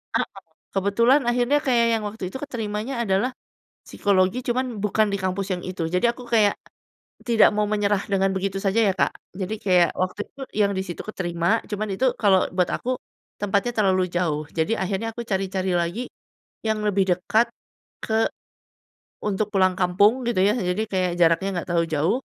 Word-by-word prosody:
Heeh. -, -, +1 dB, 0.4 s
Kebetulan 230 Hz, +8 st, +3 dB
akhirnya 245 Hz, +4 st, +2 dB
kayak 240 Hz, -3 st, +3 dB
yang 215 Hz, -, -6 dB
waktu 220 Hz, -2 st, -10 dB
itu 265 Hz, -, -6 dB
keterimanya 235 Hz, -1 st, -3 dB
adalah, 195 Hz, +6 st, +1 dB, 0.6 s
psikologi 190 Hz, +2 st, +1 dB
cuman 245 Hz, -3 st, -1 dB
bukan 215 Hz, +1 st, +2 dB
di 200 Hz, -, +1 dB
kampus 190 Hz, +1 st, -2 dB
yang 180 Hz, -, -5 dB
itu, 185 Hz, -2 st, -5 dB
jadi 235 Hz, +6 st, +3 dB
aku 250 Hz, -, -10 dB
kayak 210 Hz, -3 st, +4 dB, 0.7 s
tidak 230 Hz, -2 st, +6 dB
mau 210 Hz, -, +2 dB
menyerah 205 Hz, -1 st, +1 dB
dengan 195 Hz, 0 st, +2 dB
begitu 195 Hz, 0 st, -2 dB
saja 200 Hz, +3 st, +1 dB
ya 190 Hz, -, +2 dB
Kak, -, -, +3 dB, 0.2 s
jadi 195 Hz, +3 st, -3 dB
kayak, 180 Hz, -3 st, +4 dB
waktu 185 Hz, +2 st, -2 dB
itu 275 Hz, -, -14 dB, 0.2 s
yang 200 Hz, -1 st, +3 dB
di 190 Hz, -, -1 dB
situ 175 Hz, -, -5 dB
keterima, 175 Hz, +1 st, 0 dB
cuman 210 Hz, +1 st, -2 dB
itu 260 Hz, -, 0 dB, 0.2 s
kalau 195 Hz, -3 st, +4 dB
buat 180 Hz, -2 st, +2 dB
aku 255 Hz, 0 st, -3 dB, 0.4 s
tempatnya 205 Hz, +4 st, +1 dB
terlalu 190 Hz, -3 st, +3 dB
jauh, 160 Hz, -4 st, 0 dB
jadi 170 Hz, +7 st, 0 dB
akhirnya 210 Hz, +4 st, -2 dB
aku 235 Hz, -, -4 dB
cari-cari 190 Hz, -2 st, -1 dB
lagi, 175 Hz, +8 st, -1 dB, 0.6 s
yang 220 Hz, -1 st, +1 dB
lebih 195 Hz, -1 st, +2 dB
dekat 220 Hz, +5 st, +2 dB, 0.6 s
ke. 220 Hz, 0 st, +1 dB, 1.0 s
Untuk 210 Hz, +1 st, -1 dB
pulang 185 Hz, -1 st, +3 dB
kampung 205 Hz, +7 st, +3 dB
gitu 225 Hz, -6 st, +1 dB
ya, 200 Hz, -, +4 dB
jadi 180 Hz, +1 st, -1 dB
kayak 185 Hz, -3 st, 0 dB
jaraknya 170 Hz, +3 st, +4 dB
gak -, -, -11 dB
terlalu 170 Hz, -1 st, +2 dB
jauh, 160 Hz, -, +1 dB
200 Hz, 170 wpm, -24 LUFS, 185-225 Hz, 1.0 s, tidak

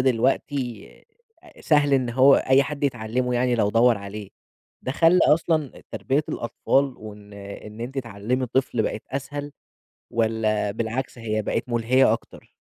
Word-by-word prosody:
دلوقتي 125 Hz, -2 st, 0 dB, 0.5 s
آآ 340 Hz, -3 st, -18 dB
سهل 145 Hz, -2 st, +3 dB
إن 130 Hz, -3 st, +1 dB
هو 130 Hz, +3 st, +6 dB
أي 130 Hz, +1 st, +4 dB
حد 145 Hz, +1 st, -4 dB
يتعلِّمه 125 Hz, -1 st, -1 dB
يعني 125 Hz, 0 st, +1 dB
لو 105 Hz, -3 st, +1 dB
دوّر 115 Hz, 0 st, +4 dB
عليه. 100 Hz, 0 st, -8 dB, 0.5 s
ده 130 Hz, -, -3 dB
خلّى 165 Hz, +4 st, +4 dB
أصلًا 155 Hz, -2 st, +1 dB
تربية 140 Hz, +3 st, 0 dB
الأطفال 135 Hz, +3 st, 0 dB
وإن 105 Hz, -1 st, -11 dB
إن 100 Hz, +2 st, -10 dB
أنتِ 130 Hz, +4 st, -5 dB
تعلِّمي 120 Hz, +2 st, -2 dB
طفل 125 Hz, -2 st, 0 dB
بقت 105 Hz, +1 st, -3 dB
أسهل 145 Hz, +2 st, -5 dB, 0.6 s
والّا 110 Hz, -2 st, 0 dB
بالعكس 115 Hz, +5 st, -4 dB
هي 110 Hz, -2 st, -2 dB
بقت 105 Hz, -, -2 dB
مُلهية 120 Hz, +3 st, +3 dB
أكتر؟ -, -, -7 dB
125 Hz, 140 wpm, -24 LUFS, 110-135 Hz, 0.6 s, هو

